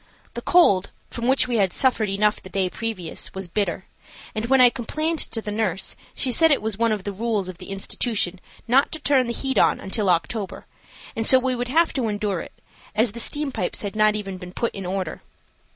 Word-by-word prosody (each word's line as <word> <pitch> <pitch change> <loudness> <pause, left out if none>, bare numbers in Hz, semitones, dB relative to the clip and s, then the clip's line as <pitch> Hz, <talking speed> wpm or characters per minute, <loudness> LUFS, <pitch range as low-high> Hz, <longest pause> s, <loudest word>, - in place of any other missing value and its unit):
The - - -5
cold, 200 - +4 0.2
from 235 0 -3
which 265 -1 +3
we 240 -2 0
had 195 -3 +2
suffered 235 -4 +2
enough 210 +2 +1
the 185 - -11
day 190 -2 -1
previous, 205 -9 -5
was 190 -1 -5
bitter, 185 -1 -2 0.5
and 215 +2 -3
when 265 +1 +4
I 250 -1 +8
complained 310 +8 -2
to 225 - -2
the 210 - -4
nurse 205 -4 -1 0.2
she 255 - +2
said 325 +6 +5
it 285 - +3
was 220 -2 -2
one 230 +2 +1
of 210 -3 -2
the 205 - -3
rules 210 -1 -1
of 180 -2 -8
the 180 - -10
institution 195 -1 -2 0.3
not 265 +4 +3
to 315 - -4
turn 275 -4 +2
the - - -2
heat 265 +2 0
on - - +3
until 195 0 -1
October, 190 +4 -1 0.5
and 225 0 0
so 260 - +9
we 255 0 0
would 245 0 -3
have 325 +6 +2
to 255 -5 -1
endure 205 -3 -1
it, - - -13 0.3
as 220 +1 +2
the 235 - -7
steam 290 +4 0
pipes 180 -4 -2
had 205 0 -4
not 215 0 +4
even 195 -3 -5
been 180 -1 -10
put 235 - -2
in 195 -2 -6
order. 190 0 -3
215 Hz, 220 wpm, -23 LUFS, 195-250 Hz, 0.5 s, so